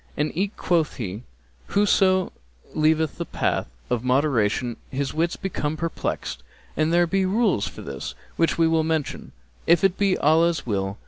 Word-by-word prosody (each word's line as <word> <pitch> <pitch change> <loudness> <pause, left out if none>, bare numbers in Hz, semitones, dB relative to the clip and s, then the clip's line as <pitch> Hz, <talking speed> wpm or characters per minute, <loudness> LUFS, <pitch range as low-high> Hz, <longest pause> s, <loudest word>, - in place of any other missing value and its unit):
And 150 - 0
eke 195 +4 -1
quoth 165 -3 +1
he, 105 -4 -5 0.5
'Whoso 190 -2 +3 0.4
leaveth 155 0 +1
the - - -2
path - - -1 0.2
of 120 -1 -1
moderation 125 -3 +1
his 135 0 -2
wits 170 +2 0
become 155 -5 -3
perplexed'; 165 +1 -3 0.3
and 155 +2 +1
there 175 +1 +4
be 190 +3 +1
rules 195 - +1
for - - -9
this 70 -2 -6 0.2
which 165 - +1
we 165 -1 +4
will 160 -1 +2
mention, 160 -2 -2 0.4
if 170 +1 +5
it 195 -1 +2
be 195 -2 +3
Allah's 165 +2 +3
will. 100 -3 -2
160 Hz, 155 wpm, -24 LUFS, 130-175 Hz, 0.5 s, if